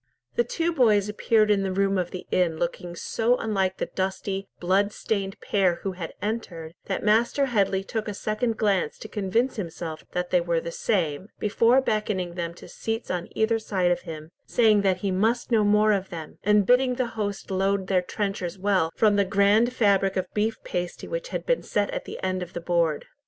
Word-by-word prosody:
The 475 - +3
two 340 -6 -1
boys 215 -8 +4
appeared 215 0 +2
in 200 -1 +3
the 195 -1 -1
room 195 +1 +1
of 175 -1 -2
the 185 - -7
inn 170 -3 +2
looking 175 +1 -3
so 230 +7 +1
unlike 195 -5 -1
the - - -1
dusty, 190 +1 -3
blood 195 +3 +2
stained 195 -3 -3
pair 190 -4 +2
who 195 - -1
had 175 -3 -7
entered, 180 -7 -4
that 190 - -3
Master 230 +6 +3
Headley 200 -6 +1
took 220 +2 -4
a 210 - -4
second 220 +2 -1
glance 195 -7 +1
to - - -8
convince 220 +5 0
himself 165 -4 -5
that 180 0 -2
they 180 - +4
were 170 -1 0
the 170 +1 -6
same, 170 -3 -1
before 230 +5 +3
beckoning 210 -7 -1
them 170 -1 -4
to - - -12
seats 225 +1 -4
on 175 -1 -2
either 225 +1 +2
side 185 -5 0
of 175 - +1
him, 155 0 -8 0.2
saying 220 -4 +4
that 190 -2 +2
he 195 - +1
must 225 +7 0
know 220 -2 +4
more 210 +1 +4
of 195 -2 0
them, 160 -3 -8
and 210 0 +4
bidding 250 +2 +4
the 250 -1 -1
host 205 -3 -4
load 195 +1 +1
their 185 -1 +2
trenchers 195 -2 -3
well 190 -4 +1
from 210 -2 +3
the 200 - +4
grand 200 +4 +3
fabric 195 -5 +2
of 185 - 0
beef 220 +1 0
pasty 175 0 -4
which - - -4
had - - -4
been - - +1
set - - -1
at - - -4
the - - -7
end 185 0 -1
of 175 -1 -7
the - - -3
board. 170 -3 0
200 Hz, 205 wpm, -25 LUFS, 180-220 Hz, 0.2 s, boys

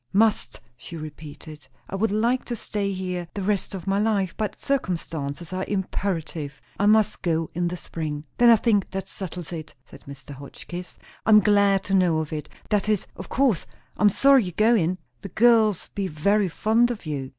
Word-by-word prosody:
"Must," 205 - +2 0.2
she 165 +7 -9
repeated. 155 0 -10 0.2
"I - - -12
would 220 +3 +1
like 230 +5 +1
to 240 - -3
stay 205 -2 -3
here 180 -2 -4
the 200 - -3
rest 200 0 -1
of 180 -2 -7
my 195 0 +1
life; 205 -4 +1
but 215 -1 -3
circumstances 170 - -3
are 185 0 -2
imperative. 170 -6 -3 0.2
I 205 - +3
must 215 0 +3
go 165 -2 -1
in 175 +1 0
the 180 +1 -4
spring." 155 -1 -5
"Then 240 0 +7
I 230 - +9
think 210 -3 +1
that 195 0 -5
settles 180 -3 -6
it," 155 -2 -7
said - - -15
Mr. 140 0 -10
Hotchkiss. 145 +6 -8 0.3
"I'm 215 -1 +7
glad 200 -2 +3
to 195 - -3
know 180 -4 +3
it. 150 -1 -6 0.2
That 210 0 +1
is! 210 -3 +1
of 185 - -9
course 255 -8 +1 0.3
I'm 210 - +4
sorry 270 +2 +5
ye're 180 - -6
goin'; 215 -6 +3 0.2
the - - -7
girls 220 -4 +3
be 200 -2 -3
very 195 +5 +1
fond 225 +7 +2
of 235 -7 -5
you." 140 -4 -4
190 Hz, 185 wpm, -24 LUFS, 160-210 Hz, 0.3 s, I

